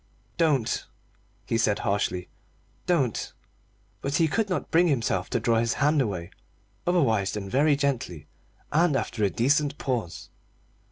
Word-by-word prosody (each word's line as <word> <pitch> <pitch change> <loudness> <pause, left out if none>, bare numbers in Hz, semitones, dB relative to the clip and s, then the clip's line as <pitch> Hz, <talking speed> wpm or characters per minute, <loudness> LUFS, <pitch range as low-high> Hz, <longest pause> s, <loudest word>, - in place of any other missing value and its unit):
"Don't," 150 -9 +1 0.6
he 115 0 0
said 105 -3 +2
harshly, 90 -3 -1 0.6
"don't." 140 - 0 0.7
But 140 +1 -2
he 165 0 +4
could 215 +6 0
not 180 - -2
bring 175 +1 +5
himself 115 - 0
to - - 0
draw 115 0 +2
his 115 0 0
hand 150 +1 +3
away 95 -7 -3 0.6
otherwise 115 - +2
than 105 -2 -4
very 145 +7 +3
gently, 125 - -2 0.5
and 160 0 +3
after 110 -4 -2
a 100 - +3
decent 140 +6 +1
pause. 120 - -3
130 Hz, 135 wpm, -26 LUFS, 105-150 Hz, 0.7 s, bring